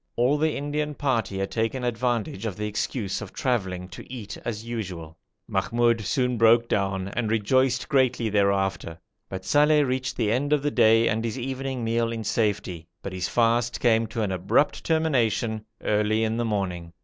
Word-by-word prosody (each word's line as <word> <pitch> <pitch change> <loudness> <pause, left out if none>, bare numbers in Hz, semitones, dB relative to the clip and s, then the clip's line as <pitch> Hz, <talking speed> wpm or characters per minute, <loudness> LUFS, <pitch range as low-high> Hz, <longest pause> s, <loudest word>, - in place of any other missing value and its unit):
All 130 +5 +2
the 155 0 +1
Indian 150 +1 -2
party 115 -9 -1
had 95 0 -2
taken 115 +3 -1
advantage 115 -3 -1
of 100 - -5
the 105 - -3
excuse 105 0 -2
of 110 - -8
travelling 95 -8 -1
to 90 - -11
eat 110 -5 -6
as 110 -1 -4
usual. 90 -9 -5 0.3
Mahmoud 120 -1 +1
soon 125 +2 0
broke 115 +1 +5
down 95 -2 -1
and 110 +1 -2
rejoiced 125 +4 +2
greatly 130 -5 +2
thereafter, 100 -4 0 0.3
but 95 0 -6
Saleh 150 +6 +4
reached 130 0 -2
the 110 -3 +1
end 140 +5 +1
of 145 -2 +1
the 145 - 0
day 115 -1 +5
and 110 +1 0
his 115 +2 -3
evening 130 0 -3
meal 115 0 0
in 115 -1 -4
safety, 100 -7 -1 0.2
but 100 - -5
his 90 -1 -2
fast 120 0 +1
came 115 -2 +3
to 110 0 -3
an 100 - -1
abrupt 100 - +1
termination 120 -9 +1 0.2
early 105 +1 +1
in 110 +1 0
the 120 - 0
morning. 90 -6 -3
115 Hz, 175 wpm, -25 LUFS, 100-125 Hz, 0.3 s, broke